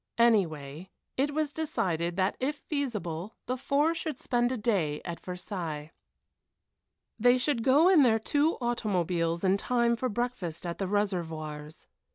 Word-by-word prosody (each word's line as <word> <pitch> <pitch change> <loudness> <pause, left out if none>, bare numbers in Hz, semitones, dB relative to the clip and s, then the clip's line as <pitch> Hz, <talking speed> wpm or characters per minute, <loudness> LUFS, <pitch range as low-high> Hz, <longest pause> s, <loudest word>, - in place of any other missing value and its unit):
Anyway, 175 -8 +1 0.3
it 280 +3 +1
was 300 0 -1
decided 175 - -1
that 190 +1 +1
if 280 +3 0
feasible 215 - -3
the 255 - -1
four 285 +5 +1
should 320 -4 -4
spend 240 -2 0
a 260 - -1
day 190 -10 0
at 170 -1 -5
Versailles. 175 -4 -5 1.3
They 245 +3 +5
should 250 -1 0
go 280 +7 +5
in 370 -5 +7
their 230 -4 +5
two 290 +8 +1
automobiles 180 -8 0
in 190 +1 +3
time 235 +2 +2
for 255 +2 -2
breakfast 205 -8 -3
at 170 -1 -4
the 195 - -1
Réservoirs. 160 -7 -3
210 Hz, 145 wpm, -29 LUFS, 170-255 Hz, 1.3 s, in